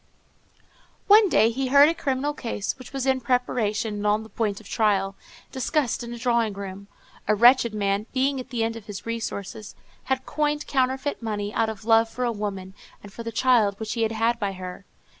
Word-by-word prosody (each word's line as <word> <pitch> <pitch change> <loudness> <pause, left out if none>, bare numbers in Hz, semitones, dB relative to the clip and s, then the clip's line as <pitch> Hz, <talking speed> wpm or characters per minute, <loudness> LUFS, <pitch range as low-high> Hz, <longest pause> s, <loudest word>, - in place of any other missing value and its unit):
One 415 0 +7
day 225 -7 +4
he 265 +3 -2
heard 280 +2 +7
a 325 - +2
criminal 280 -2 -1
case, 230 -7 -3
which 255 - -11
was 270 -2 -3
in 265 -1 +2
preparation 235 -3 0
and 205 0 -2
on 210 +1 +2
the 220 - -13
point 210 -4 -2
of - - -15
trial, 195 -3 +1 0.4
discussed 260 -1 -1
in 235 - -7
a 240 - -6
drawing 235 -3 +1
room. 195 0 -8 0.4
A 215 - +3
wretched 235 0 +5
man, 200 +1 0
being 270 +1 +1
at 255 - -8
the 240 -3 -1
end 225 0 -1
of 225 -2 -10
his 205 -2 -7
resources, 220 -2 -5 0.3
had 265 -1 -1
coined 295 0 -1
counterfeit 265 +1 -1
money, 210 -2 -3
out 225 -1 +1
of 215 -1 -8
love 225 0 +4
for 250 - -4
a 240 - +1
woman, 195 -3 -5 0.3
and 205 -1 -12
for 235 - -8
the 230 0 -5
child 230 -4 +3
which 220 -1 -3
he 230 - -2
had 225 0 +1
had 230 +2 +1
by 200 -3 -2
her. 185 +1 -8
230 Hz, 205 wpm, -25 LUFS, 210-255 Hz, 0.4 s, One